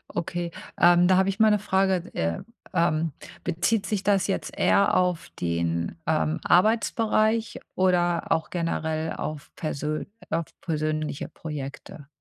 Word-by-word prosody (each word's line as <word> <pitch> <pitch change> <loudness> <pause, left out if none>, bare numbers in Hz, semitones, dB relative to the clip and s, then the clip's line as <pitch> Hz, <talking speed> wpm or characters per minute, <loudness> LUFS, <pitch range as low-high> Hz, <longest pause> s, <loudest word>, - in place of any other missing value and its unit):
Okay, 175 0 -3 0.3
ähm, 175 +1 +6
da 185 0 +5
habe 190 0 +3
ich 195 +3 -3
mal 220 -1 +6
'ne 210 - +3
Frage. 190 -2 +2
D 185 - -13
äh, 85 0 -1 0.3
ähm, 165 -2 +1 0.3
bezieht 180 +5 0
sich 205 -2 -2
das 200 -1 +2
jetzt 195 - -3
eher 200 - +3
auf 180 -2 +1
den, 85 - -1
ähm, 155 0 +1
Arbeitsbereich 220 +2 +2 0.2
oder 175 -2 +2
auch 160 -1 +1
generell 160 -2 -2
auf 155 -2 -6
persö 155 -1 -3 0.2
auf 165 0 0 0.2
persönliche 155 -3 -2
Projekte? 145 -1 -8
170 Hz, 140 wpm, -26 LUFS, 155-190 Hz, 0.3 s, ähm